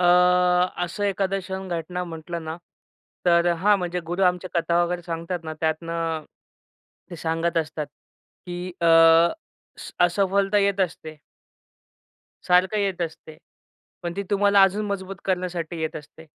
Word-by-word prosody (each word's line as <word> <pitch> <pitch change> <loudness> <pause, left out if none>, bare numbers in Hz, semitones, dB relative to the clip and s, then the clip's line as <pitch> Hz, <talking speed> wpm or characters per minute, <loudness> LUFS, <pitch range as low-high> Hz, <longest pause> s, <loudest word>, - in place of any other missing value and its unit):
अ, - - +2 0.8
असं 175 +4 -4
एखादं 195 -1 0
क्षण, 190 0 -6
घटना 175 +1 -3
म्हटलं 170 0 -6
ना, 160 +1 -5 0.7
तर 170 0 +4
अ, 175 - +3
हां, 200 +5 +3
म्हणजे 180 0 -3
गुरु 180 +2 -1
आमचे 180 0 +1
कथा 170 0 +2
वगैरे 175 0 -2
सांगतात 170 0 -4
ना, 160 0 -5
त्यातनं 165 0 -2 0.9
ते 175 - -7
सांगत 165 +1 -1
असतात, 155 -1 -3 0.6
की 175 0 -5
अ, 170 - +2 0.9
स - - -9
असफलता 195 +3 +2
येत 200 -1 +1
असते 160 -4 -3 1.3
सारखं 180 +3 +3
येत 195 -3 -1
असते. 155 -1 -7 0.7
पण 175 -1 -3
ती 200 - -1
तुम्हाला 200 0 +4
अजून 200 +2 +2
मजबूत 195 -1 -4
करण्यासाठी 180 -3 -2
येत 160 -1 -3
असते. 150 +1 -12
175 Hz, 140 wpm, -24 LUFS, 165-190 Hz, 1.3 s, तर